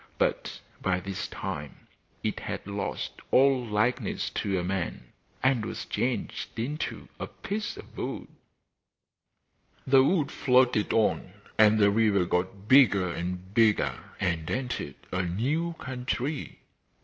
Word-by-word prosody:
But - - -1 0.2
by 90 -1 +1
this 95 +1 -4
time 75 -1 -6 0.4
it - - -1
had - - -5
lost 100 0 -3 0.2
all 135 -1 +5
likeness 110 +2 0
to 95 -1 -1
a 90 - -1
man, 90 -10 -3 0.3
and 130 -3 +3
was 110 - -5
changed 125 -1 -2
into 145 +8 -3
a - - -3
piece 210 +1 -4
of - - -12
wood. - - -4 1.6
The 130 0 +6
wood 155 -1 +2
floated 125 -5 +3
on, 105 -4 +1 0.2
and 110 0 +6
the 100 -1 +5
river 105 -3 +3
got 95 +3 -2
bigger 105 -9 +6
and 90 +3 -5
bigger 110 -1 +4 0.3
and 85 -4 -1
entered 125 - -3 0.2
a 90 - 0
new 135 - -1
country. 130 +1 -4
110 Hz, 125 wpm, -28 LUFS, 95-130 Hz, 1.6 s, The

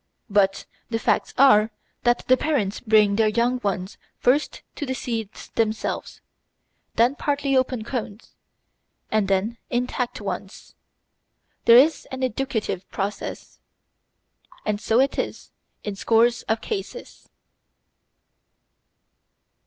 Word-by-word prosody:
But 195 -1 +2 0.2
the 225 - 0
facts - - +1
are 220 -5 +6 0.4
that 240 0 +2
the 255 - +6
parents 255 -9 -1
bring 215 -3 +4
their 220 -1 +4
young 235 +3 +1
ones 190 -2 -3 0.2
first 280 +4 +1
the 265 -4 -3
seeds 225 -5 -5
themselves, 220 -1 -2 0.7
then 240 +3 +4
partly 285 -1 0
opened 255 -3 +1
cones, 225 -4 -5 0.8
and 215 -2 +2
then 200 +4 0
intact 245 0 -2
ones. - - -6 0.9
There 235 - +9
is 300 +6 +4
an 260 0 -5
educative 235 -6 -2
process, 200 +1 -5 1.1
and 210 0 -1
so 225 +2 +2
it 270 +1 +2
is - - -4 0.3
in 205 -2 -4
scores 230 +3 +3
of 220 0 +1
cases. 435 - -6
230 Hz, 110 wpm, -24 LUFS, 210-255 Hz, 1.1 s, There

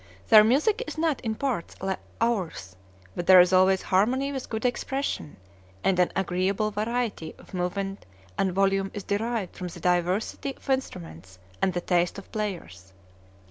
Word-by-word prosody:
Their 215 -1 +9
music 310 - +2
is - - -6
not 315 -3 0
in 220 -3 -2
parts 250 -9 -3
like 190 0 -2 0.2
ours, 185 - -1 0.4
but 175 - -4
there 185 -1 +9
is 180 +1 +5
always 185 +1 +4
harmony 250 +9 +1
with 265 -2 -5
good 220 +1 -3
expression, 265 - -2 0.5
and 185 -2 +2
an 180 - +3
agreeable 190 +3 0
variety 215 -4 -2
of - - -17
movement 195 - -3 0.3
and 190 - +1
volume 195 +1 +1
is 205 - -5
derived 215 -1 -2
from 180 - -5
the 175 - -9
diversity 180 - 0
of - - -16
instruments 90 - -4 0.2
and 190 - +2
the 175 - -2
taste 175 0 +1
of 200 - -7
the - - -26
players. 170 - -5
195 Hz, 165 wpm, -26 LUFS, 180-230 Hz, 0.5 s, Their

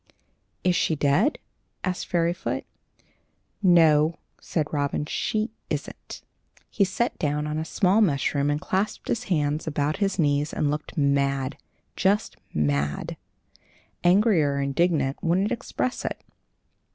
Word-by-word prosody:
"Is 180 -1 +3
she 160 - +1
dead?" 150 - +2 0.5
asked 185 -1 -2
Fairyfoot. 175 +1 -1 1.0
"No," 165 -4 +5 0.3
said 155 -3 -1
Robin; 145 0 0
"she 215 +8 -1 0.2
isn't." - - -6 0.5
He 205 - +2
sat 215 +5 -1
down 150 -2 0
on 150 +1 -2
a - - -1
small 195 +5 +2
mushroom 140 -5 +1
and 145 0 0
clasped 190 +6 -2
his 235 +2 -1
hands 150 -3 0
about 150 0 0
his 200 -2 0
knees 145 -2 +1
and 145 - 0
looked 150 +2 -5
mad 140 -1 +1 0.4
just 200 +3 +1 0.2
mad. 70 -1 -1 0.9
Angry 190 +1 +4
or 140 -1 +1
indignant 140 0 0
wouldn't 185 +5 +2
express 250 +2 -2
it. - - -3
155 Hz, 125 wpm, -25 LUFS, 145-185 Hz, 1.0 s, No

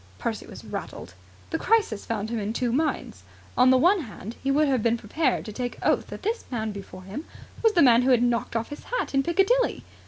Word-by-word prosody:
Percy - - -4
was - - -11
rattled. 90 - -7 0.4
The - - -1
crisis 430 - +1
found 220 -1 -2
him 230 - -1
in 210 +1 -2
two 240 0 0
minds. 305 +5 -1 0.3
On 250 +1 +5
the 260 - +6
one 360 +9 +4
hand, 225 - -8
he 270 - 0
would 295 +2 +3
have 260 -4 +2
been 230 +1 +2
prepared 255 +6 -1
to 215 - -7
take 245 +2 -4
oath - - +2
that - - -9
this 450 +3 -1
man 220 -3 -2
before 190 -2 -9
him 205 - -7 0.4
was 450 -2 +4
the 345 - +5
man 240 -2 +6
who 255 - +1
had 245 -2 +5
knocked 235 -1 0
off 230 0 -1
his 290 - -9
hat - - -2
in 275 - +4
Piccadilly. 390 - +2
250 Hz, 225 wpm, -26 LUFS, 225-315 Hz, 0.4 s, the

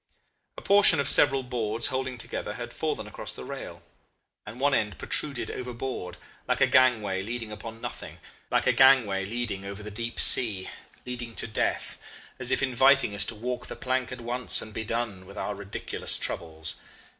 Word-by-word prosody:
A - - -9
portion 200 -6 +6
of 140 - 0
several 135 -1 +5
boards 115 -2 -1
holding 130 -1 -3
together 110 - -4
had - - -7
fallen - - -3
across - - -7
the - - -9
rail, - - -8 0.6
and 110 +4 -9
one 140 +1 +2
end 105 -5 -1
protruded 140 -4 -2
overboard, 125 -7 -6 0.3
like - - 0
a - - +5
gangway 110 -7 +2
leading 115 +1 -6
upon 115 +1 -9
nothing, 120 0 -8 0.3
like - - +1
a - - +4
gangway 120 -8 +4
leading 110 -2 -4
over 100 +1 -8
the 105 - -8
deep 115 +3 -5
sea, 105 -7 +7 0.4
leading 120 -2 -6
to - - -2
death 110 - -3 0.4
as 125 -1 +2
if 130 - +1
inviting 135 -2 +3
us 100 - -1
to 115 - -4
walk 120 +2 -5
the - - -7
plank 130 0 -2
at 125 -1 -7
once 120 +1 +2
and 110 - -5
be 110 - -4
done 110 -4 -4
with 100 - -13
our 105 - -3
ridiculous 100 0 -1
troubles. 80 -1 -4
120 Hz, 180 wpm, -26 LUFS, 105-130 Hz, 0.6 s, sea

